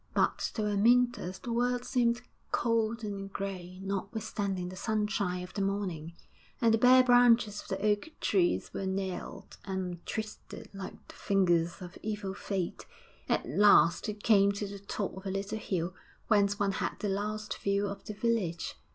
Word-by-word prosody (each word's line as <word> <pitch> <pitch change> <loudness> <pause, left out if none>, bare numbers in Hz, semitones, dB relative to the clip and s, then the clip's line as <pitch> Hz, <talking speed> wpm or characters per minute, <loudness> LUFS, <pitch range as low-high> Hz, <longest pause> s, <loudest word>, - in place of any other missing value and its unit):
But - - +2 0.2
to 220 - -1
Amyntas 215 -1 +3
the 235 - -5
world 245 +1 +1
seemed 240 -2 +1 0.3
cold 230 -1 +1
and 200 -2 -5
grey, 185 -2 -5
notwithstanding 195 -1 -3
the 185 - -8
sunshine 200 -3 -1
of 180 - -10
the 200 - -2
morning; 190 -5 -2 0.5
and 230 -1 +4
the 225 - +3
bare 255 +2 +7
branches 245 -4 +5
of - - -15
the 195 +1 -2
oak 210 +6 +1
trees 350 -3 +1
were 195 - -3
gnarled 190 0 -4
and 185 -3 -4
twisted 220 0 -6
like 195 -1 -8
the - - -12
fingers 175 -2 +1
of 175 -1 -10
evil 210 -2 -3
fate. 195 -3 -4 0.4
At - - +1
last 170 - +5
he 210 - -2
came 200 -2 +4
to 200 +1 -3
the 200 0 -8
top 200 0 -4
of 190 +1 -8
a - - -1
little 200 +3 -3
hill 180 -3 -2 0.4
whence 205 -2 +3
one 200 -1 +2
had - - -1
the 210 - -3
last 210 +2 -3
view 200 0 +1
of 200 0 -5
the 210 - -6
village. 200 -7 -1
200 Hz, 170 wpm, -31 LUFS, 190-220 Hz, 0.5 s, bare